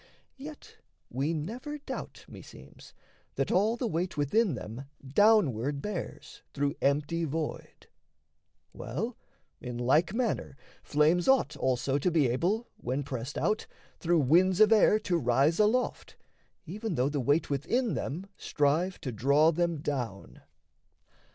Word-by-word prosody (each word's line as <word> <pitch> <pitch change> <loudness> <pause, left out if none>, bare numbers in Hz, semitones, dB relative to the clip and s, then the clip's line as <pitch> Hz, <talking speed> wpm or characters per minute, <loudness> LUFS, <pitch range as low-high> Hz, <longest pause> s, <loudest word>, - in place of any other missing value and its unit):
Yet 295 +2 -11 0.3
we 140 +5 -1
never 230 - -5
doubt, 295 - -8
meseems, - - -14 0.4
That - - -1
all 215 +5 +2
the 245 - -2
weight 180 -4 -2
within 170 - +2
them 115 +4 -7 0.2
downward 145 - +3
bears 200 +3 -6
Through 140 0 0
empty 150 +4 +1
void. 160 0 -5 0.9
Well, 215 - -4 0.5
in 125 -4 -6
like 140 +9 +2
manner, 230 - -2 0.2
flames 155 +4 +2
Ought 260 - +3
also 130 +1 0
to 180 - +1
be 160 -5 +3
able, 185 - 0
when 130 +3 -3
pressed 130 0 -5
out, 215 - 0 0.3
Through 170 -1 +2
winds 175 +7 +3
of 215 0 +6
air 215 0 +5
to 175 -3 0
rise 135 - +2
aloft, 220 +4 0 0.5
even 205 +3 -4
though 125 0 +1
The 145 -1 -2
weight 145 +4 +1
within 215 - 0
them 165 +8 -4
strive 160 +6 0
to 130 - -4
draw 140 +8 +3
them 170 -2 -1
down. 115 - -4
155 Hz, 130 wpm, -29 LUFS, 140-205 Hz, 0.9 s, of